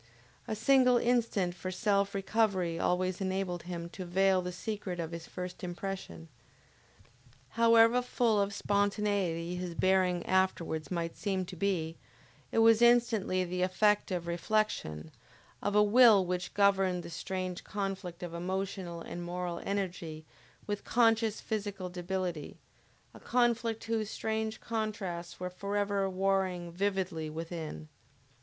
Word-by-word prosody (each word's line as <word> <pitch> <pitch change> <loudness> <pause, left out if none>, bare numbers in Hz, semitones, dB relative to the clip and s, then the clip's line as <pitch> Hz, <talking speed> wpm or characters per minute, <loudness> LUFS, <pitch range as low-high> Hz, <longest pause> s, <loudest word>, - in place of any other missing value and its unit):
A 220 - -2
single 250 +2 +5
instant 230 -7 +1
for 180 +1 -6
self 200 +1 +1
recovery 195 -4 +1
always 185 +2 0
enabled 190 -2 -2
him 170 -1 -4
to 185 - -7
veil 190 +1 +3
the 180 0 -4
secret 190 -1 -4
of 165 -1 -3
his 165 -1 -7
first 180 0 -7
impression. 175 - -5 1.2
However 230 +1 +5
full 235 -4 +2
of 200 0 0
spontaneity 200 -4 0
his 180 -1 -4
bearing 185 -1 +2
afterwards 185 -4 0
might 170 -2 -3
seem 190 -3 -1
to 185 - -9
be, 165 -3 -1 0.5
it - - -2
was 225 0 +6
instantaneously 235 -6 +4
the 180 +1 -2
effect 210 +3 +2
of 180 -3 -2
reflection, 170 - -1 0.5
of 205 0 -1
a 210 - +7
will 215 -2 +7
which 180 0 -3
governed 195 -3 +3
the - - -8
strange 185 +1 -4
conflict 195 -3 -4
of 175 -1 -5
emotional 185 -1 -3
and 175 +1 -6
moral 175 0 -4
energy 175 -6 -3 0.4
with 205 -1 -3
conscious 225 -2 +2
physical 200 -4 -3
debility; 180 -3 -4 0.6
a - - -12
conflict 235 -2 +1
whose 225 -2 -1
strange 220 0 -2
contrasts 210 -6 -4
were 180 0 -4
forever 200 +1 -1
warring 185 -2 0
vividly 185 -4 -1
within. 160 -1 -6
190 Hz, 130 wpm, -31 LUFS, 175-210 Hz, 1.2 s, a